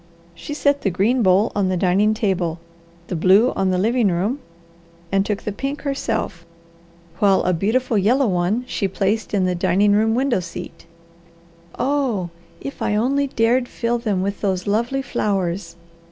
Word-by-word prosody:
She 295 Hz, -, -7 dB
set 285 Hz, -1 st, +1 dB
the 195 Hz, -, +1 dB
green 205 Hz, +8 st, +1 dB
bowl 195 Hz, +2 st, +3 dB
on 200 Hz, -2 st, 0 dB
the 185 Hz, -, 0 dB
dining 195 Hz, +4 st, +2 dB
table, 185 Hz, -6 st, -1 dB, 0.5 s
the 180 Hz, -, -4 dB
blue 195 Hz, +9 st, +4 dB
on 190 Hz, -, 0 dB
the 185 Hz, -, +1 dB
living 225 Hz, +4 st, +2 dB
room, 195 Hz, +9 st, 0 dB, 0.7 s
and 195 Hz, 0 st, +2 dB
took 205 Hz, 0 st, -3 dB
the 210 Hz, -, -3 dB
pink 275 Hz, +8 st, -4 dB
herself, 225 Hz, -, -2 dB, 0.8 s
while 200 Hz, -3 st, +4 dB
a 180 Hz, -, +1 dB
beautiful 220 Hz, +5 st, +1 dB
yellow 250 Hz, +8 st, +3 dB
one 190 Hz, +4 st, 0 dB
she 210 Hz, -5 st, -2 dB
placed 200 Hz, +3 st, -1 dB
in 195 Hz, -3 st, +1 dB
the 180 Hz, -, +1 dB
dining 195 Hz, +3 st, +2 dB
room 220 Hz, +2 st, +3 dB
window 255 Hz, -4 st, +1 dB
seat. 175 Hz, -1 st, -9 dB, 0.9 s
"Oh, 255 Hz, -11 st, 0 dB, 0.3 s
if 275 Hz, -, -8 dB
I 210 Hz, -, 0 dB
only 275 Hz, +6 st, +1 dB
dared 245 Hz, 0 st, +1 dB
fill 235 Hz, 0 st, -2 dB
them 205 Hz, -5 st, -1 dB
with 200 Hz, +1 st, -3 dB
those 190 Hz, -3 st, -1 dB
lovely 235 Hz, +6 st, 0 dB
flowers!" 195 Hz, -7 st, -2 dB
205 Hz, 165 wpm, -21 LUFS, 185-240 Hz, 0.9 s, blue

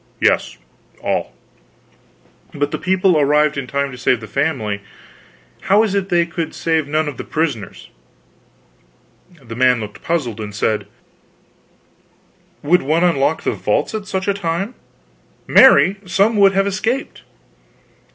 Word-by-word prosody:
"Yes, -, -, +1 dB, 0.5 s
all." -, -, -1 dB, 1.2 s
"But 145 Hz, 0 st, -1 dB
the -, -, -3 dB
people 185 Hz, -3 st, +2 dB
arrived 150 Hz, +1 st, +2 dB
in 140 Hz, -2 st, -4 dB
time 140 Hz, +1 st, -2 dB
to 125 Hz, -, -10 dB
save 125 Hz, 0 st, +1 dB
the 110 Hz, -, -9 dB
family; 110 Hz, -7 st, -2 dB, 0.9 s
how 205 Hz, +3 st, +5 dB
is 215 Hz, -3 st, -1 dB
it 200 Hz, -1 st, -1 dB
they 175 Hz, -2 st, +2 dB
could 170 Hz, -1 st, -5 dB
save 160 Hz, -3 st, 0 dB
none 155 Hz, +1 st, 0 dB
of 145 Hz, -, -5 dB
the -, -, -5 dB
prisoners?" 150 Hz, -, -3 dB, 1.6 s
The 115 Hz, -2 st, -8 dB
man 125 Hz, 0 st, +3 dB
looked 105 Hz, -1 st, -8 dB
puzzled, 140 Hz, -10 st, -2 dB
and 105 Hz, -1 st, -7 dB
said: 110 Hz, 0 st, -1 dB, 1.8 s
"Would 175 Hz, +5 st, +3 dB
one 155 Hz, +5 st, +1 dB
unlock 160 Hz, -3 st, +1 dB
the -, -, 0 dB
vaults -, -, -1 dB
at 210 Hz, -2 st, -5 dB
such 190 Hz, 0 st, -3 dB
a 200 Hz, -, +2 dB
time? 195 Hz, +3 st, -3 dB, 0.7 s
Marry, 180 Hz, +8 st, +6 dB
some 200 Hz, +5 st, +2 dB
would 195 Hz, -1 st, +5 dB
have 195 Hz, 0 st, +2 dB
escaped." 220 Hz, +7 st, -2 dB
160 Hz, 140 wpm, -18 LUFS, 135-190 Hz, 1.8 s, Marry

